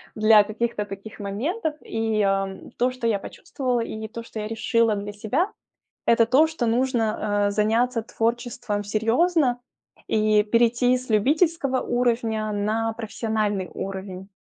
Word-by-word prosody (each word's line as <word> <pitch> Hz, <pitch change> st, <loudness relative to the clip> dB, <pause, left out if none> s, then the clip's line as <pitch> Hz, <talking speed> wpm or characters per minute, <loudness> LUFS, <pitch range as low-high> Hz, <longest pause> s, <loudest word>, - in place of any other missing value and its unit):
для 215 Hz, -1 st, +6 dB
каких-то 215 Hz, 0 st, -2 dB
таких 200 Hz, +2 st, -9 dB
моментов. 295 Hz, -, -2 dB
И 225 Hz, -1 st, -1 dB, 0.6 s
то, 250 Hz, +1 st, +2 dB
что 255 Hz, -2 st, -3 dB
я 210 Hz, -3 st, +1 dB
почувствовала, 250 Hz, +4 st, -3 dB
и 220 Hz, -1 st, -5 dB
то, 230 Hz, +1 st, -8 dB
что 225 Hz, -, -8 dB
я 210 Hz, -, -3 dB
решила 225 Hz, 0 st, +1 dB
для 205 Hz, 0 st, -5 dB
себя- 240 Hz, -, -1 dB, 0.5 s
это 230 Hz, 0 st, +5 dB
то, 270 Hz, +7 st, +4 dB
что 315 Hz, -7 st, -3 dB
нужно, 225 Hz, -4 st, +1 dB
а, -, -, 0 dB
заняться 225 Hz, +4 st, +1 dB
творчеством 230 Hz, -2 st, -2 dB
серьезно 245 Hz, -, +2 dB, 0.5 s
и 215 Hz, -1 st, +3 dB
перейти 240 Hz, +3 st, +3 dB
с 255 Hz, -1 st, -10 dB
любительского 275 Hz, -, +2 dB
уровня 230 Hz, -3 st, 0 dB
на 220 Hz, +2 st, -1 dB
профессиональный 215 Hz, -4 st, -2 dB
уровень. 190 Hz, 0 st, -6 dB
225 Hz, 135 wpm, -24 LUFS, 210-245 Hz, 0.6 s, для